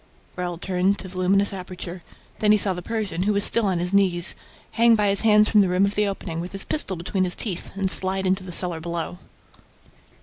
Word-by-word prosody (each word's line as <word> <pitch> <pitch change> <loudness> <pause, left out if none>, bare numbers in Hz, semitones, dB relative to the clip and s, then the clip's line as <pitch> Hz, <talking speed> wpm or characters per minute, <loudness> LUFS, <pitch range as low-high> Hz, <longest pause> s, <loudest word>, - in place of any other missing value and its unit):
Raoul 175 -1 -4
turned 185 +2 0
to 190 - -7
the 185 - -12
luminous 195 +2 +2
aperture. 180 -1 -6 0.4
Then 210 -1 +3
he 215 - +6
saw 200 -2 +2
the 180 - -5
Persian, 210 -4 -3
who 205 +3 +1
was 200 0 +1
still 230 -3 +2
on 185 -2 0
his 180 +2 -2
knees, 185 -3 +2 0.4
hang 230 0 +4
by 210 -2 +2
his 195 0 +2
hands 210 -1 +5
from 210 - +4
the 190 - +2
rim 180 +2 +3
of 200 - -2
the 210 0 +1
opening, 180 -4 -5
with 175 +3 -6
his 195 - -1
pistol 245 -11 0
between 180 +3 -2
his 180 -1 0
teeth, 185 -6 -4
and 190 -1 +2
slide 190 0 0
into 190 0 0
the 185 - -8
cellar 175 -1 -2
below. 170 +1 -4
190 Hz, 230 wpm, -23 LUFS, 180-200 Hz, 0.4 s, he